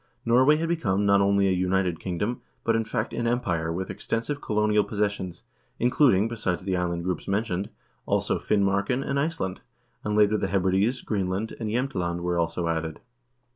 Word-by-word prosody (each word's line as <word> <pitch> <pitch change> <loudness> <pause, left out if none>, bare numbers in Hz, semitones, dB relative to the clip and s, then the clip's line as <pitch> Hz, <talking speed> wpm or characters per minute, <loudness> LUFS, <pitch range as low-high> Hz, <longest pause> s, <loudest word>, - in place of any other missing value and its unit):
Norway 130 +6 +5
had 165 +2 -1
become 105 - 0
not 100 0 +5
only 100 0 +3
a - - +2
united 90 -2 +1
king 90 -2 -4
dom, 115 +7 -2 0.2
but, 115 - +2
in 115 - +1
fact, 105 - -3
an 120 - -1
empire 90 -10 0
with 95 +3 -3
extensive 140 +6 -3
colonial 105 0 +2
possessions, 100 -4 -2 0.3
including, 120 -4 +4
besides 105 -7 -2
the 95 -1 -1
island 85 -1 -1
groups 90 0 -3
mentioned, 100 -1 -1 0.4
also - - +1
Finmarken 100 +6 +1
and 140 0 0
Iceland; 140 - -2 0.4
and 105 0 -1
later 105 0 +4
the 100 - -1
Hebrides, 95 +6 +1
Greenland, 100 +1 -2
and 110 -2 -3
Jsemtland 95 -8 -1
were 85 0 0
also 85 +1 -1
added. 80 -1 -2
100 Hz, 170 wpm, -26 LUFS, 90-115 Hz, 0.4 s, Norway